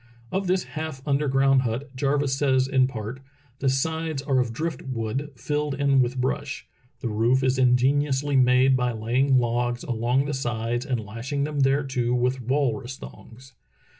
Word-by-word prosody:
Of 190 0 -1
this 185 0 +1
half 155 -3 -6
underground 135 -1 +3
hut 130 +3 -4
Jarvis 140 0 +1
says 130 -2 +2
in 130 -1 +3
part: 115 0 -6 0.4
"The 135 - +1
sides 160 +2 -1
are 135 -2 +1
of 120 -2 0
drift 160 +7 -3
wood, 130 +3 -3
filled 145 +3 -2
in 140 -1 +3
with 125 +1 -1
brush. 135 +2 -2 0.4
The 125 - -2
roof 115 +4 +2
is 130 0 +1
ingeniously 135 +3 +2
made 130 +1 +5
by 125 -1 0
laying 125 +5 +2
logs 120 0 0
along 120 +3 0
the 145 - -3
sides 120 -1 -2
and 125 -3 0
lashing 120 +7 -3
them 150 0 -3
thereto 135 -3 +1
with 125 +1 0
walrus 130 -1 -1
thongs. 130 +3 -13
130 Hz, 160 wpm, -25 LUFS, 125-140 Hz, 0.4 s, made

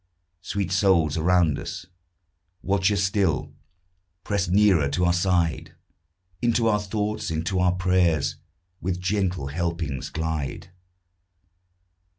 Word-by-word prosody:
Sweet 100 -2 -3
souls 90 -6 +3
around 85 -1 +2
us! - - -6 0.8
watch 95 +1 +2
us 100 -1 +1
still, 95 -7 0 0.7
Press 100 -2 -1
nearer 95 -6 +4
to 90 +6 0
our 90 - +3
side, 90 -3 0 0.7
Into 120 -1 +2
our 105 -2 +3
thoughts, 105 +1 -3
into 80 +4 -1
our 90 -1 +3
prayers, 90 -4 +1 0.4
With 90 0 -2
gentle 90 -5 -1
helpings 85 -3 -3
glide. 80 +1 -4
90 Hz, 110 wpm, -24 LUFS, 80-100 Hz, 0.8 s, nearer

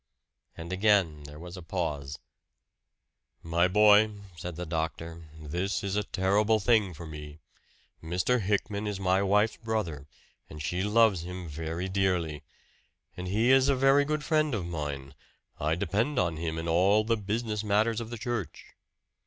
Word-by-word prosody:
And 85 +2 -6
again 95 -7 +2
there 75 +1 -10
was 85 +3 -9
a 90 - -8
pause. 75 -5 -3 1.3
"My 85 +2 +2
boy," 105 +2 +6 0.3
said 85 +2 -6
the 90 +2 -5
doctor, 80 0 -4
"this 90 +8 -2
is 100 0 -2
a 105 - +2
terrible 105 +3 +2
thing 105 -5 +2
for 85 +2 -8
me. 75 -1 -9 0.7
Mr. 90 +9 +1
Hickman 100 +1 -1
is 100 -2 -3
my 95 0 +2
wife's 105 +3 +2
brother, 90 -11 -3 0.4
and 75 - -9
she 90 +4 -2
loves 105 -2 +3
him 90 0 -7
very 80 +4 -4
dearly. 90 -6 0 0.7
And 90 0 -6
he 110 +7 +2
is 135 +1 +5
a 140 - +4
very 135 +2 +4
good 150 +1 -2
friend 155 -4 +1
of 95 -5 -3
mine 75 -5 -5 0.5
I 80 +2 +1
depend 115 - -1
on 85 -7 +1
him 80 0 -3
in 80 +1 -4
all 95 +6 +4
the 115 +1 +1
business 105 +1 -2
matters 110 +2 +1
of 115 - -7
the 120 - -6
church. 110 - -5
95 Hz, 160 wpm, -28 LUFS, 80-110 Hz, 1.3 s, boy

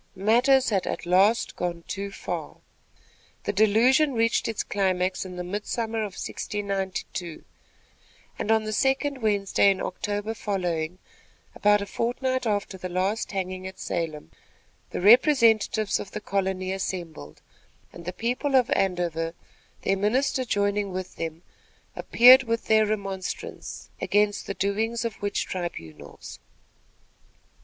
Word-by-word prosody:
Matters 245 +7 +3
had 195 -3 0
at - - -3
last 195 +7 +3
gone 170 -1 -3
too 200 0 -4
far. 195 - -6 0.9
The 205 - -2
delusion 235 +8 +4
reached 230 0 +2
its 225 -2 -2
climax 185 -1 0
in 180 -1 -8
the 180 - -4
midsummer 220 +4 -3
of 210 -3 -3
1692, 190 -4 -4 0.9
and 215 - -3
on 220 0 +3
the 215 0 -3
second 270 +3 +1
Wednesday 200 -2 +3
in 195 - +1
October 205 0 -3
following, 180 -6 -2 0.6
about 205 0 +3
a - - -5
fortnight 255 +4 -1
after 205 -2 -2
the 185 - -5
last 190 +5 -1
hanging 185 -1 -4
at 190 - -10
Salem, 155 - -4 0.6
the - - -4
representatives 225 - +4
of 195 - -7
the 210 - -5
colony 190 -2 -2
assembled, 170 - -5 0.5
and 170 - -11
the 180 - -3
people 250 +8 -1
of 255 -1 +3
Andover, 170 -3 0 0.5
their 195 - +1
minister 255 +6 +1
joining 205 -2 0
with 185 0 -6
them, 165 +1 -5 0.5
appeared 255 +3 +7
with 230 -3 -2
their 220 -1 +4
remonstrance 195 -3 -5
against 205 0 +1
the 200 - -3
doings 220 +4 -1
of 230 - -5
witch 205 0 -1
tribunals. 80 - -7
200 Hz, 130 wpm, -26 LUFS, 185-225 Hz, 0.9 s, appeared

